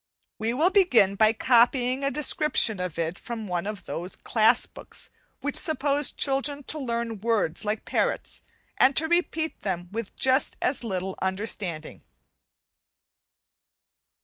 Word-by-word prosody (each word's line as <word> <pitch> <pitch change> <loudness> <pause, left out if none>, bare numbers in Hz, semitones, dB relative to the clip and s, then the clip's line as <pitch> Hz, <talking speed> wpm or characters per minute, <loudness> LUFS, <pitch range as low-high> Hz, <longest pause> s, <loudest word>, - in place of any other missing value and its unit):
We 225 +2 -1
will 330 +7 +3
begin 250 - +4
by 215 +2 +4
copying 250 +2 +3
a 275 - +2
description 290 -6 +1
of 180 -3 -4
it 165 +1 -2
from 230 -2 -6
one 180 +1 -2
of 210 -2 -6
those 175 +3 -4
class 225 +1 +3
books - - -8 0.3
which 285 +1 -2
suppose 290 -2 +3
children 280 +1 -1
to 305 - -3
learn 235 -4 -3
words 215 -5 0
like 210 +1 -2
parrots, - - -2 0.4
and 270 +1 +4
to 320 - +1
repeat 325 -2 -1
them 180 -3 -3
with 225 -1 -5
just 265 +1 +2
as 255 -1 0
little 190 -3 -3
understanding. 190 -4 -3
235 Hz, 135 wpm, -26 LUFS, 195-275 Hz, 0.4 s, begin